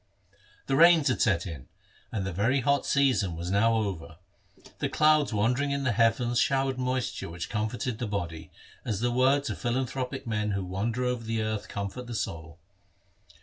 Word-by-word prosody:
The 135 Hz, -, 0 dB
rains 165 Hz, -1 st, +6 dB
had 130 Hz, -, 0 dB
set 95 Hz, -7 st, +2 dB
in, 75 Hz, -8 st, -8 dB, 0.4 s
and 100 Hz, -3 st, -2 dB
the 95 Hz, -, -3 dB
very 120 Hz, +9 st, +1 dB
hot 140 Hz, +3 st, +1 dB
season 130 Hz, -11 st, +2 dB
was 85 Hz, +2 st, -4 dB
now 115 Hz, +3 st, +3 dB
over. 90 Hz, -7 st, -3 dB, 0.6 s
The -, -, -1 dB
clouds 155 Hz, -2 st, +3 dB
wandering 120 Hz, +7 st, +1 dB
in 140 Hz, 0 st, -1 dB
the 130 Hz, -, +1 dB
heavens 120 Hz, +2 st, +2 dB
showered 135 Hz, -1 st, +1 dB
moisture 130 Hz, -6 st, -2 dB
which 85 Hz, 0 st, -6 dB
comforted 110 Hz, +2 st, -2 dB
the 120 Hz, -, -2 dB
body, 85 Hz, -6 st, -4 dB, 0.3 s
as 105 Hz, -2 st, -3 dB
the 120 Hz, 0 st, +1 dB
words 135 Hz, +1 st, +2 dB
of -, -, -6 dB
philanthropic 125 Hz, +1 st, -2 dB
men 105 Hz, -2 st, -1 dB
who 100 Hz, -1 st, -2 dB
wander 110 Hz, +7 st, -2 dB
over 125 Hz, -2 st, -1 dB
the 110 Hz, -1 st, -1 dB
earth 110 Hz, -1 st, -3 dB
comfort 100 Hz, +5 st, -5 dB
the 120 Hz, -, -5 dB
soul. 80 Hz, -5 st, -5 dB
115 Hz, 175 wpm, -28 LUFS, 100-130 Hz, 0.6 s, rains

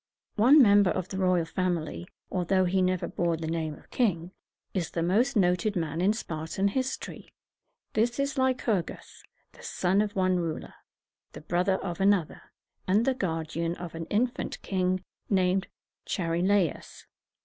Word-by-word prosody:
One 255 Hz, +8 st, +7 dB
member 205 Hz, -3 st, +5 dB
of 185 Hz, +1 st, -2 dB
the 190 Hz, -, -4 dB
royal 180 Hz, -3 st, +2 dB
family, 175 Hz, -1 st, -2 dB, 0.2 s
although 185 Hz, +1 st, +2 dB
he 185 Hz, +1 st, +1 dB
never 185 Hz, -1 st, +1 dB
bore 170 Hz, -1 st, -1 dB
the 160 Hz, -, -5 dB
name 160 Hz, -1 st, -2 dB
of -, -, -19 dB
king, 180 Hz, -8 st, 0 dB, 0.4 s
is 180 Hz, -4 st, -1 dB
the 165 Hz, -, -2 dB
most 230 Hz, +10 st, +2 dB
noted 185 Hz, +1 st, +2 dB
man 165 Hz, -1 st, -2 dB
in 195 Hz, +3 st, +4 dB
Spartan 170 Hz, -1 st, -2 dB
history. 260 Hz, +5 st, -4 dB, 0.6 s
This 235 Hz, +4 st, +1 dB
is 280 Hz, +1 st, 0 dB
Ly 260 Hz, -1 st, +2 dB
cur´gus, 210 Hz, -8 st, -3 dB, 0.3 s
the -, -, -17 dB
son 190 Hz, +3 st, +1 dB
of 210 Hz, -1 st, -2 dB
one 185 Hz, -1 st, +2 dB
ruler, 165 Hz, -3 st, -4 dB, 0.6 s
the -, -, -9 dB
brother 180 Hz, +4 st, +1 dB
of 175 Hz, -1 st, -4 dB
another, 195 Hz, -5 st, +2 dB, 0.5 s
and 205 Hz, +5 st, +3 dB
the 270 Hz, -, +3 dB
guardian 165 Hz, -4 st, -2 dB
of 175 Hz, -1 st, -8 dB
an 165 Hz, 0 st, -5 dB
infant 240 Hz, +7 st, -1 dB
king 185 Hz, -1 st, 0 dB, 0.3 s
named 190 Hz, -1 st, +2 dB, 0.4 s
Char 165 Hz, -3 st, -1 dB
i 170 Hz, -, 0 dB
la´us. 190 Hz, -3 st, 0 dB
185 Hz, 160 wpm, -28 LUFS, 170-205 Hz, 0.6 s, One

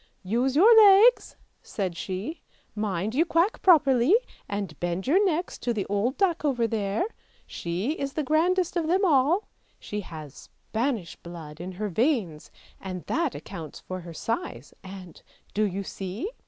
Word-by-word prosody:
" -, -, -42 dB
Use 260 Hz, +2 st, +1 dB
your 430 Hz, +9 st, +7 dB, 0.3 s
legs," -, -, +3 dB, 0.3 s
said 185 Hz, -4 st, -4 dB
she; 195 Hz, -, -5 dB, 0.2 s
" -, -, -38 dB
mind 210 Hz, -1 st, -2 dB
you 300 Hz, +6 st, +3 dB
quack 340 Hz, +5 st, +1 dB
properly, 290 Hz, -, +5 dB, 0.3 s
and 200 Hz, -7 st, -4 dB
bend 175 Hz, +2 st, -2 dB
your 365 Hz, +10 st, +4 dB
necks 355 Hz, -2 st, -1 dB
to 240 Hz, -1 st, -2 dB
the 200 Hz, -, -2 dB
old 205 Hz, +7 st, -1 dB
duck 355 Hz, -5 st, +1 dB
over 255 Hz, -6 st, +1 dB
there! 210 Hz, -, -1 dB, 0.4 s
She 175 Hz, -, -3 dB
is 275 Hz, -3 st, -4 dB
the 305 Hz, -, -1 dB
grandest 340 Hz, +5 st, +1 dB
of 335 Hz, -3 st, 0 dB
them 375 Hz, +4 st, +2 dB
all; 315 Hz, +5 st, +3 dB, 0.3 s
she 210 Hz, 0 st, -5 dB
has 155 Hz, -6 st, -9 dB, 0.2 s
Spanish 225 Hz, -6 st, -3 dB
blood 165 Hz, -2 st, -10 dB
in 185 Hz, +1 st, -6 dB
her 210 Hz, +3 st, -3 dB
veins 205 Hz, -, 0 dB, 0.3 s
and 185 Hz, -2 st, -6 dB
that 325 Hz, -5 st, -1 dB
accounts 165 Hz, -6 st, -8 dB
for 185 Hz, 0 st, -6 dB
her 175 Hz, -1 st, -9 dB
size, 145 Hz, -, -4 dB
and, 185 Hz, -2 st, -11 dB, 0.3 s
do 215 Hz, +1 st, +2 dB
you 200 Hz, 0 st, -3 dB
see? 195 Hz, -, -5 dB
220 Hz, 165 wpm, -26 LUFS, 185-310 Hz, 0.4 s, your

